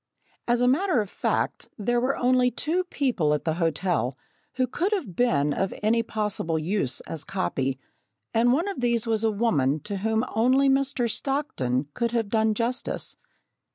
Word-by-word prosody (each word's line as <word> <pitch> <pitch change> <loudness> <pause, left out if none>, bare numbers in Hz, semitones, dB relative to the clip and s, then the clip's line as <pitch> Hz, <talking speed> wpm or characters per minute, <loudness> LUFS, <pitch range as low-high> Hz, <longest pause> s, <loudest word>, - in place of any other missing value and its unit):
As 240 0 +2
a 245 - +4
matter 330 +3 +3
of 205 -3 -3
fact, - - -1
there 240 +3 +1
were 265 +2 0
only 250 0 +3
two 330 +9 -1
people 235 - +1
at 150 - -5
the 160 - +1
hotel 160 -6 0 0.4
who 255 - +1
could 345 - -1
have 235 - -3
been 150 -12 +2
of 195 - -1
any 230 +2 +3
possible 210 -7 -1
use 160 -5 -1
as 160 -2 -5
copy, 135 -8 -2 0.6
and 235 +2 +4
one 325 +9 +1
of 395 -10 -4
these 235 -2 +1
was 225 -1 0
a 225 - +3
woman 155 - +1
to 200 +4 -4
whom 220 +4 0
only 255 +5 +4
Mr. 270 -2 +1
Stockton 180 - -1
could 235 -1 -1
have 225 -3 0
done 220 0 +2
justice. 240 +3 -2
225 Hz, 170 wpm, -26 LUFS, 180-255 Hz, 0.6 s, a